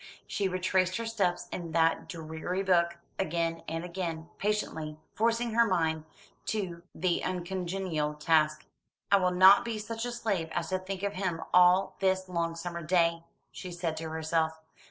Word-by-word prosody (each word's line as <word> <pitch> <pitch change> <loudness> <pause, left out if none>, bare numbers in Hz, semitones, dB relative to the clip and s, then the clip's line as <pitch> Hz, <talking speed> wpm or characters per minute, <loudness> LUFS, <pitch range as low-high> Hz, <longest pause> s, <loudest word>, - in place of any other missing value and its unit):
She 200 - -1
retraced 185 0 +1
her 230 - -3
steps 200 -6 0
in 170 -3 -5
that 165 0 +2
dreary 165 +3 -4
book, 170 -2 +3 0.2
again 165 -2 -1
and 165 +1 -3
again, 170 -2 -4
patiently, 160 -7 -2 0.2
forcing 230 +1 +1
her 235 0 +5
mind 160 -4 0 0.4
to 185 -6 -2
the 175 +1 0
uncongenial 180 -4 -2
task. 155 0 +2 0.5
"I 200 - +8
will 185 -2 +2
not 190 +5 +7
be 230 -2 -3
such 225 +2 -5
a 245 - -3
slave 200 -9 -1
as 170 - -2
to 185 0 0
think 190 +1 -6
of 200 0 -1
him 180 -4 -2
all 180 +2 +5
this 190 -1 +1
long 170 -2 -1
summer 170 0 -5
day," 170 0 +2 0.3
she 185 - -8
said 170 -2 -2
to 160 0 -4
herself. 160 0 0
180 Hz, 160 wpm, -30 LUFS, 165-190 Hz, 0.5 s, I